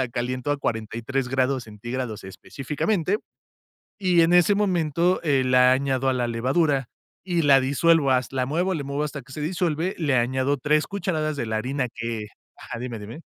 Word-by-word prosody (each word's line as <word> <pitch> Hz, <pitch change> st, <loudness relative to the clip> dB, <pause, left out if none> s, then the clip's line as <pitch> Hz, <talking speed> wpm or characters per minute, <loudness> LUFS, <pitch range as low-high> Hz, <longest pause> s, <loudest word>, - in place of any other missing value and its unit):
la 130 Hz, -, -2 dB
caliento 125 Hz, +3 st, -3 dB
a 145 Hz, -, +1 dB
43 115 Hz, +2 st, -2 dB
grados 130 Hz, 0 st, 0 dB
centígrados, 115 Hz, +1 st, -5 dB
específicamente, 155 Hz, -, -2 dB, 0.8 s
y 180 Hz, -3 st, +3 dB
en 165 Hz, +1 st, +4 dB
ese 180 Hz, +3 st, +5 dB
momento, 175 Hz, -3 st, +1 dB
eh, 140 Hz, -5 st, +2 dB
la 125 Hz, 0 st, +5 dB
añado 135 Hz, 0 st, 0 dB
a -, -, +2 dB
la 125 Hz, -1 st, -1 dB
levadura 135 Hz, +3 st, +1 dB, 0.4 s
y 175 Hz, -3 st, 0 dB
la 140 Hz, -2 st, +6 dB
disuelvo 145 Hz, +2 st, +3 dB
has 130 Hz, -1 st, +1 dB
la 130 Hz, -1 st, 0 dB
muevo, 175 Hz, +6 st, 0 dB
le 155 Hz, -5 st, -3 dB
muevo 140 Hz, +2 st, -2 dB
hasta 150 Hz, -1 st, -5 dB
que 135 Hz, +1 st, -17 dB
se 150 Hz, -, -6 dB
disuelve, 170 Hz, +2 st, -1 dB
le 145 Hz, -5 st, +1 dB
añado 130 Hz, +3 st, +1 dB
3 150 Hz, +3 st, +1 dB
cucharadas 165 Hz, -6 st, -2 dB
de 120 Hz, -, -2 dB
la 110 Hz, 0 st, -2 dB
harina 130 Hz, +3 st, -2 dB
que 115 Hz, -2 st, -4 dB, 0.3 s
ajá, 115 Hz, -, -8 dB
dime, 120 Hz, -1 st, -5 dB
dime. 110 Hz, +9 st, -9 dB
135 Hz, 180 wpm, -24 LUFS, 125-160 Hz, 0.8 s, la